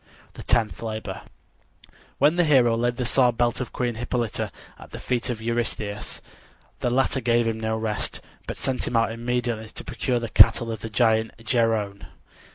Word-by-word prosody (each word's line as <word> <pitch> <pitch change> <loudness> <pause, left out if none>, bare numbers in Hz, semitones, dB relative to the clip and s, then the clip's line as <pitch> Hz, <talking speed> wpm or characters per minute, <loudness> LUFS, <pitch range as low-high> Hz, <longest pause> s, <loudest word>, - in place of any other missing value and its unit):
THE - - -9
TENTH 115 -3 +1
LABOR 110 -1 -5 1.0
When 150 +4 +4
the 175 - +3
hero 130 -7 +4
laid 120 +1 0
the 125 - -1
sword 125 -1 +3
belt 120 0 +1
of 125 - -5
Queen 120 -1 -1
Hippolyta 120 0 -2 0.3
at - - -12
the - - -8
feet 125 0 -1
of 110 -2 -4
Eurystheus, 110 -3 -3 0.6
the 125 - 0
latter 130 +1 +1
gave 120 -1 +2
him 110 -1 -2
no 110 0 -1
rest, 110 -1 -2 0.3
but - - -5
sent 130 -1 -2
him 120 - -2
out 115 0 +3
immediately 120 -1 -2
to - - -8
procure 125 -2 -1
the 115 - -4
cattle 115 +1 +5
of 110 - -5
the 115 - -5
giant 110 0 +2
Geryone. 110 -4 0
115 Hz, 175 wpm, -24 LUFS, 110-125 Hz, 1.0 s, cattle